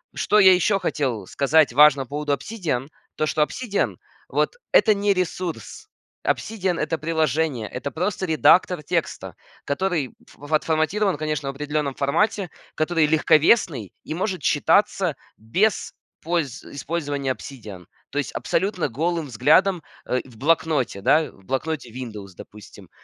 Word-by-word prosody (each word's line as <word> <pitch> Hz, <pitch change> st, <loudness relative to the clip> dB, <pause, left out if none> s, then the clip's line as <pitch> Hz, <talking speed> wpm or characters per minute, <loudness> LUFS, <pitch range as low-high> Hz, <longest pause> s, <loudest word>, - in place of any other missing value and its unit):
Что 210 Hz, -, +2 dB
я 190 Hz, -2 st, +8 dB
еще 195 Hz, +2 st, +2 dB
хотел 130 Hz, -, -2 dB
сказать 140 Hz, 0 st, +3 dB
важно 145 Hz, +1 st, +6 dB
по 130 Hz, -, -17 dB
поводу 145 Hz, 0 st, -1 dB
"Обсидиан", 145 Hz, -, -3 dB, 0.3 s
то, 155 Hz, -, 0 dB
что 150 Hz, -, +2 dB
"Обсидиан" 205 Hz, +5 st, -2 dB, 0.3 s
вот- -, -, 0 dB, 0.2 s
это 215 Hz, -2 st, +5 dB
не 200 Hz, 0 st, +2 dB
ресурс. 185 Hz, -, -4 dB, 0.4 s
"Обсидиан"- 190 Hz, -5 st, -1 dB
это 155 Hz, +2 st, -1 dB
приложение, 155 Hz, -6 st, -1 dB
это 140 Hz, +3 st, -5 dB
просто 185 Hz, +5 st, -2 dB
редактор 175 Hz, +1 st, +4 dB
текста, -, -, -3 dB, 0.3 s
который 155 Hz, -3 st, -1 dB
ф 145 Hz, +1 st, -13 dB
отформатирован, 160 Hz, +6 st, +1 dB
конечно, 150 Hz, -2 st, -2 dB
в -, -, -2 dB
определенном 150 Hz, 0 st, -2 dB
формате, 170 Hz, +7 st, 0 dB, 0.2 s
который 160 Hz, 0 st, +1 dB
легковесный 155 Hz, -, +3 dB
и -, -, -5 dB
может 185 Hz, +1 st, -2 dB
читаться 175 Hz, +2 st, +2 dB, 0.2 s
без 185 Hz, -, 0 dB, 0.3 s
польз 165 Hz, -6 st, -2 dB
использования 145 Hz, -2 st, -3 dB
"Обсидиан", 110 Hz, -9 st, -9 dB, 0.2 s
то 145 Hz, -, -7 dB
есть 145 Hz, -, -2 dB
абсолютно 185 Hz, -4 st, -1 dB
голым 160 Hz, +5 st, -2 dB
взглядом, 155 Hz, -, +3 dB, 0.2 s
э, 125 Hz, -, 0 dB
в 125 Hz, -4 st, -16 dB
"Блокноте", 150 Hz, -6 st, +1 dB
да? 155 Hz, +9 st, +3 dB
В 95 Hz, -, -22 dB
"Блокноте" 140 Hz, +2 st, -3 dB
"Виндовс", 110 Hz, -6 st, -8 dB
допустим. 105 Hz, -1 st, -13 dB
155 Hz, 135 wpm, -23 LUFS, 135-180 Hz, 0.4 s, я